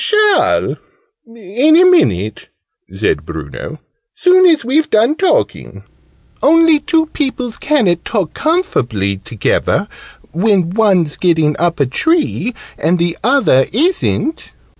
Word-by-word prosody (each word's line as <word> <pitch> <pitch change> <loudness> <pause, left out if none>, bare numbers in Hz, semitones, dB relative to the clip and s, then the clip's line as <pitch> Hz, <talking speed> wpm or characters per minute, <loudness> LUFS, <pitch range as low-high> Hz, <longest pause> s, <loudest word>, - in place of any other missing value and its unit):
"Shall, 425 -3 +2 0.5
in 230 - +1
a 365 - +5
minute," 110 - +1 0.4
said 95 -7 -2
Bruno: 80 - -8 0.4
"soon 370 +1 +4
as 315 -8 +2
we've 305 +6 0
done 225 +6 +2
talking. 385 +9 -2 0.6
Only 325 0 +4
two 325 +1 0
peoples 260 -6 -4
ca'n't 210 - 0
talk 200 -8 -3
comfably 120 - -1
togevver, 105 +1 -1 0.4
when 185 -1 0
one's 190 -7 +1
getting 160 -4 +1
up 170 -2 -1
a 140 - +2
tree, 265 - -1 0.2
and 165 +4 +1
the 170 0 -1
other 240 - +2
isn't!" 320 - -1
225 Hz, 115 wpm, -14 LUFS, -, 0.6 s, a